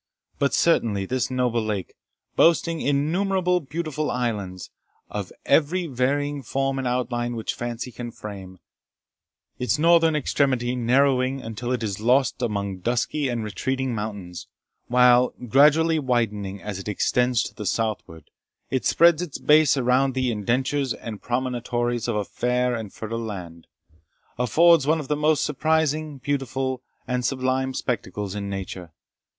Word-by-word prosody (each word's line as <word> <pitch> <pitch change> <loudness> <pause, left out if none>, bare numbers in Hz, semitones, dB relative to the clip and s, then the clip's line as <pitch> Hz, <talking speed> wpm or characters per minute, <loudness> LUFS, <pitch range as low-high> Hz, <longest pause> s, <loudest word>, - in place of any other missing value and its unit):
But 140 - +2
certainly 110 -12 +2
this 130 +5 -1
noble 125 -2 0
lake, 105 -4 -3 0.4
boasting 165 0 +3
innumerable 180 +6 +1
beautiful 155 0 -3
islands, 105 -7 -3 0.4
of - - -4
every 170 +4 +2
varying 145 +1 -1
form 135 +2 -1
and 130 - -2
outline 120 -1 -1
which 110 - -3
fancy 120 +1 -5
can 120 0 -6
frame, 100 -4 -9 1.0
its 125 +3 +1
northern 165 0 +4
extremity 130 -4 +1
narrowing 130 +2 +2
until 115 +2 -5
it 125 -3 -1
is 100 -3 -3
lost 130 +4 +2
among 100 -5 -2
dusky 125 +7 -1
and 120 -2 -2
retreating 130 +5 -2
mountains, 100 -5 -6 0.4
while, 125 0 +4
gradually 155 +5 +5
widening 105 -7 -1
as 105 -2 -5
it 95 - -8
extends 125 +4 +1
to - - -7
the 105 - -6
southward, 105 -9 -3 0.4
it 130 - 0
spreads 170 -1 +4
its 175 -6 -5
base 150 -2 +4
around 130 +1 +2
the 130 -2 +1
indentures 130 +4 0
and 110 -3 -8
promontories 120 -1 -1
of 120 - -1
a 105 -1 -1
fair 125 +2 0
and 110 -4 -5
fertile 115 +1 -5
land, 90 -7 -7 0.7
affords 155 +5 +5
one 160 +1 +3
of 145 - -7
the 150 - +2
most 150 0 +2
surprising, 155 0 0
beautiful, 130 -1 -2 0.3
and 125 0 -1
sublime 130 +1 0
spectacles 105 -6 -3
in 100 -1 -4
nature. 95 -3 -6
125 Hz, 140 wpm, -24 LUFS, 110-140 Hz, 1.0 s, gradually